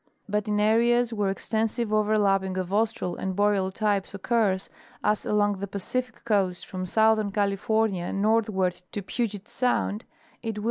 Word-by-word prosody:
But 210 +1 -1
in 210 0 +1
areas 235 +2 +3
where 205 -3 0
extensive 220 +2 -1
over 215 0 +3
lapping 195 -2 +1
of 185 0 -3
Austral 210 -4 0
and 190 -1 -3
Boreal 200 -2 +2
types 200 -1 -1
occurs, 200 -2 +1 0.4
as 210 0 +1
along 205 -2 +2
the 200 - -3
Pacific 220 +5 -4
coast 195 -5 +1
from 185 -1 -5
southern 220 +1 +3
California 200 -1 0
northward 200 -3 +1
to 205 - -3
Puget 215 -1 -3
sound, 240 -4 0 0.4
it 225 -2 -4
will - - -2
210 Hz, 150 wpm, -26 LUFS, 195-220 Hz, 0.4 s, areas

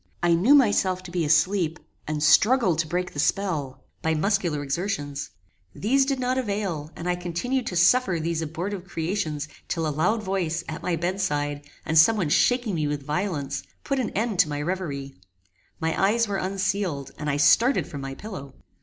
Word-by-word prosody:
I 175 0 +4
knew 205 +13 +5
myself 190 -8 +3
to 180 - -9
be 175 -1 0
asleep, 160 +2 +2 0.3
and 150 -1 -2
struggled 185 - +4
to 165 - 0
break 180 +3 -2
the 145 - -5
spell, 145 -8 -1 0.2
by 160 0 +1
muscular 170 -4 0
exertions. 145 -2 -3 0.5
These 265 +6 +2
did 275 -2 0
not 255 +1 0
avail, 200 - -3
and 170 - -6
I 180 - +1
continued 210 +9 -2
to 180 - -3
suffer 175 +1 +4
these 165 0 -1
abortive 175 +5 -4
creations 165 -4 -2 0.2
till 165 -1 -1
a 155 - -1
loud 210 +8 +1
voice, 175 -4 -1
at 160 - -5
my 180 - 0
bed 180 +4 -2
side, 145 -4 -2 0.2
and 160 0 +4
some 220 +8 +6
one 175 -7 0
shaking 245 - +2
me 155 -3 0
with 145 -1 -3
violence, 150 -2 -2 0.2
put 275 -1 -1
an 245 - -1
end 215 -3 -1
to 175 -5 +5
my 145 -1 -3
reverie. 145 -5 -3 0.7
My 160 0 0
eyes 225 +3 +3
were 200 -1 -1
unsealed, 185 -7 -2
and 150 - -2
I 140 - 0
started 150 - +4
from 145 - -7
my 135 0 -5
pillow. 140 -10 -8
175 Hz, 185 wpm, -25 LUFS, 150-200 Hz, 0.7 s, some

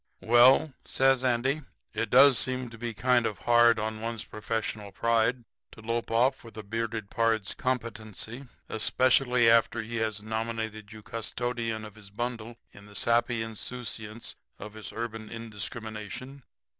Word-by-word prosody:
"'Well,' 125 +5 +6
says 135 -1 +2
Andy, 130 +4 +1 0.3
'it 115 - -1
does 135 0 +7
seem 130 -2 -1
kind 120 +1 +1
of 105 - -4
hard 120 -1 +5
on 110 0 -3
one's 115 0 -3
professional 110 -1 -4
pride 115 +3 +1 0.3
to 115 - -13
lope 115 +1 -2
off 125 +4 +2
with 115 -1 -13
a 110 - -6
bearded 110 0 -3
pard's 115 -3 +1
competency, 115 0 -4 0.2
especially 125 +2 +3
after 115 0 +4
he 115 +1 -5
has 110 -2 -2
nominated 110 -1 -4
you 110 -1 -11
custodian 115 0 -3
of 105 - -10
his 105 -2 -14
bundle 120 +1 -4 0.2
in 100 0 -15
the 105 - -14
sappy 120 0 +2
insouciance 115 0 -6 0.2
of 105 +1 -9
his 110 -1 -6
urban 110 -1 -5
indiscrimination. 110 +3 -6
115 Hz, 140 wpm, -28 LUFS, 110-120 Hz, 0.3 s, does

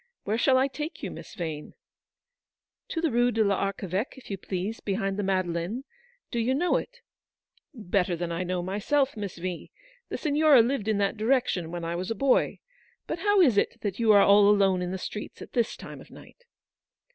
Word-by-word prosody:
Where 215 +3 -1
shall 260 0 +4
I 265 +1 +3
take 300 +4 -6
you, - - -3
Miss - - -10
Vane? 160 -4 -5 0.6
" - - -66
"To 325 - -2
the 325 -4 +1
Rue 240 +1 +3
de 225 -2 +2
PArcheveque, 195 +2 -1
if 260 - -11
you 195 - -2
please, 190 +4 -4
behind 195 -1 -2
the 205 - -2
Madeleine. 185 +3 -1 0.5
Do 235 - -1
you 250 +3 +1
know 350 +5 +2
it? 485 -1 -7 0.4
" - - -65 0.2
"Better 185 -4 0
than 170 0 -4
I 170 +1 -2
know 180 0 -2
myself, 255 +9 0
Miss 200 -5 -5
V. 180 0 -5 0.4
The - - -3
Signora 300 -4 +5
lived 235 -3 -1
in 215 -2 +2
that 200 +2 0
direction 220 -7 +1
when 170 0 -5
I 170 +1 -2
was 180 +1 -4
a 225 - -1
boy. 275 +1 +2 0.4
But 325 - -4
how 410 +1 +3
is 245 - +5
it 230 - -2
that 205 -1 -3
you 225 -2 +4
are 205 -1 +7
all 200 0 +6
alone 195 -3 +3
in 180 - -2
the 190 - -3
streets 210 +3 -7
at - - -10
this 235 -2 0
time - - -10
of - - -15
night - - -16
205 Hz, 205 wpm, -27 LUFS, 185-260 Hz, 0.6 s, are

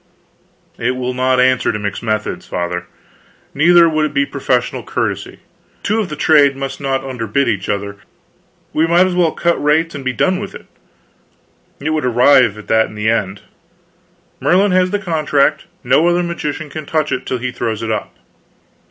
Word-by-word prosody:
"It 125 +2 0
will 125 0 -3
not 130 0 +1
answer 130 0 +3
to 105 - -3
mix 100 -1 -4
methods, 110 -2 -3
Father; 90 0 -3 0.7
neither 170 +3 +5
would 155 -1 +1
it 155 - -1
be 280 - +3
professional - - -1
courtesy. - - -4 0.4
Two 215 +2 0
of 205 -7 -3
a - - -3
trade 145 -3 +4
must 135 +1 -5
not 135 -1 -1
underbid 130 0 -1
each 100 -4 -2
other. 100 0 -3 0.8
We 160 +2 +2
might 175 +2 +4
as 185 - -1
well 175 -3 +2
cut 170 -1 0
rates 160 +3 +2
and 140 - -7
be 130 - 0
done 185 +8 0
with 200 -1 -7
it; - - -11 1.1
it 150 +3 -2
would 155 -1 -1
arrive 125 -2 +4
at 105 - -11
that 110 0 +3
in - - -12
the 105 +1 +1
end. 100 -3 -2 1.0
Merlin 195 +4 +3
has 185 0 +3
the 205 - 0
contract; 155 -5 0 0.2
no 150 +7 +3
other 175 0 +2
magician 155 -3 -4
can 155 -2 -7
touch 155 -1 0
it 130 - -3
till 130 - -1
he 125 +1 -4
throws 115 -3 -3
it 110 - -2
up." 110 - -4
140 Hz, 180 wpm, -17 LUFS, 115-165 Hz, 1.1 s, neither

